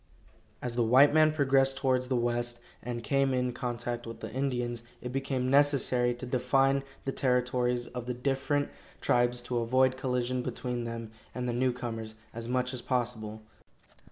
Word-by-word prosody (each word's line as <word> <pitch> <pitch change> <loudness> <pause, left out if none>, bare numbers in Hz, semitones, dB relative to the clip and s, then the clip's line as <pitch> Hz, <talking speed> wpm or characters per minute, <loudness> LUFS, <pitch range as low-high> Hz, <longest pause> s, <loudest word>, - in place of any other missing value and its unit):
As 120 -1 -3
the 120 - +2
white 130 +6 +6
man 155 0 +6
progressed 135 -2 +3
towards 130 -1 +1
the 130 - 0
West, 120 0 0 0.2
and 120 -1 -4
came 135 +2 +2
in 125 -1 0
contact 120 -1 -3
with 115 - -7
the - - -7
Indians, 125 -3 -1 0.2
it 125 - -6
became 130 -1 -1
necessary 135 -4 +3
to 125 - -7
define 135 +2 +2 0.2
the 135 - 0
territories 125 -2 +1
of 125 -1 -7
the 125 - -2
different 140 +3 0 0.3
tribes 120 0 +2
to 120 0 -1
avoid 130 +2 +3
collision 125 -1 -1
between 125 -1 -3
them 115 -1 -5 0.2
and 125 0 -2
the 120 - -1
newcomers 120 -3 -2 0.2
as 115 0 -5
much 125 +1 0
as 125 - -3
possible. 110 -4 -2
125 Hz, 160 wpm, -30 LUFS, 120-130 Hz, 0.3 s, white